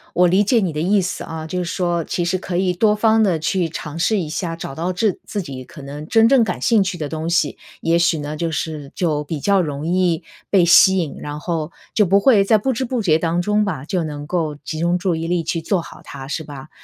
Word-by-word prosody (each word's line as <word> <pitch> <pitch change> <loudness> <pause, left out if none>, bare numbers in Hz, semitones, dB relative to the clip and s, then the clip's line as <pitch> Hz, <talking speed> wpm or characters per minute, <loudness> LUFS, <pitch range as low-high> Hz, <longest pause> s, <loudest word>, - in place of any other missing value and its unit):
我 180 - +5
理 190 +4 +3
解 235 +3 +3
你 180 -5 -1
的 150 - -3
意 200 +5 +3
思 175 -2 -3
啊， 160 -1 -6
就 180 +3 -3
是 - - -5
说 175 -1 -1
其 175 - -2
实 185 +2 0
可 175 -1 -3
以 185 0 +1
多 210 +4 +3
方 220 +1 +3
地 190 -6 +2
去 170 +2 -1
尝 155 0 -6
试 210 +6 +2
一 170 - -3
下， 165 +1 -3
找 165 - -7
到 170 +6 -2
治 195 +1 0
自 205 - -3
己 135 -5 -7
可 140 +3 -12
能 145 +2 -8
真 225 +4 +5
正 260 -1 +5
感 180 -5 -2
兴 225 -3 +3
趣 190 -1 -3
的 155 -3 -3
东 160 +2 -4
西， 170 -4 +1 0.2
也 165 +1 +2
许 170 -1 +2
呢， 150 0 -5
就 165 +2 -2
是 150 -2 -4
就 155 -4 0
比 150 +1 -4
较 200 +5 +3
容 145 -3 -4
易 175 -1 +1 0.3
被 185 -4 +4
吸 190 +2 +7
引， 165 -6 -2
然 150 0 -5
后 160 0 -3 0.2
就 215 - +4
不 195 +1 +4
会 205 -2 +5
在 215 +2 +4
不 260 +6 -1
知 250 - -2
不 245 -2 -2
觉 160 -4 +3
当 170 +1 0
中 210 +4 +1
吧， 160 -9 -3
就 180 0 -1
能 145 -2 -6
够 155 -2 -2
集 150 +2 -7
中 170 +2 +1
注 180 -1 0
意 165 +1 -3
力 175 -1 0
去 165 +1 -2
做 180 +1 0
好 - - -12
它， 135 -1 -9
是 160 +3 -3
吧？ 145 0 -10
170 Hz, 280 characters per minute, -20 LUFS, 155-190 Hz, 0.3 s, 吸